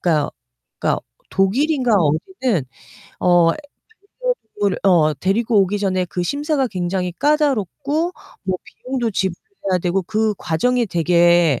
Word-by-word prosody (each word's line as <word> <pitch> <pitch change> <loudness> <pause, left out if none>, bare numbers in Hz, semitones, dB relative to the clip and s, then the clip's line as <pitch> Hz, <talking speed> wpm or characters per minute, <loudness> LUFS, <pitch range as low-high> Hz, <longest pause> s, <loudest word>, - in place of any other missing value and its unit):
그니까 155 -4 +1 0.5
그니까 - - +1 0.3
독일인가 250 +6 +2
어디는 185 - +1 0.6
어 175 -2 +5 0.5
반려 - - -3 0.2
동물 205 -2 0
어 165 -5 +4
데리고 205 - +2
오기 195 +2 +1
전에 185 -2 0
그 180 - -3
심사가 285 - 0
굉장히 180 -3 -2
까다롭고 295 - 0 0.3
뭐 185 -1 -1
비용도 250 -3 -3
지불해야 190 - -2
되고 185 +2 +1
그 215 +2 0
과정이 235 +9 +1
되게 170 - +3
195 Hz, 275 characters per minute, -20 LUFS, 175-260 Hz, 0.6 s, 어